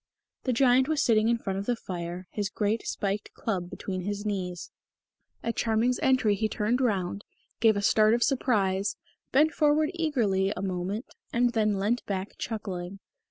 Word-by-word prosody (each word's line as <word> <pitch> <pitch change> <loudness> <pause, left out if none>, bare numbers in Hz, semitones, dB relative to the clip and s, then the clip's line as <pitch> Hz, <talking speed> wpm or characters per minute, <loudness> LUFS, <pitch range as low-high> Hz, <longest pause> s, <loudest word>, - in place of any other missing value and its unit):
The 255 - +2
Giant 255 +1 +4
was 310 -1 0
sitting 225 -5 +3
in 235 - +3
front 195 -4 -3
of 200 - -6
the 245 - +2
fire, 175 -3 -6
his 205 -2 -2
great 210 +3 -1
spiked 200 +1 -2
club 185 -5 -2
between 185 -1 -5
his 205 +2 -4
knees. 180 -4 -3 0.7
At 230 - -2
Charming's 230 +2 +1
entry 255 -5 +3
he 215 +2 0
turned 225 +5 0
round, 200 -4 0 0.4
gave 220 -2 +4
a 200 - -2
start 215 +2 +5
of 240 - +1
surprise, 205 -8 +1 0.4
bent 300 +4 +4
forward 305 0 +2
eagerly 230 - +1
a - - -3
moment, 190 +4 -2 0.3
and 240 0 +2
then 215 -3 +2
leant 215 +5 0
back 195 0 -3
chuckling. 195 -4 -4
215 Hz, 165 wpm, -28 LUFS, 195-240 Hz, 0.7 s, start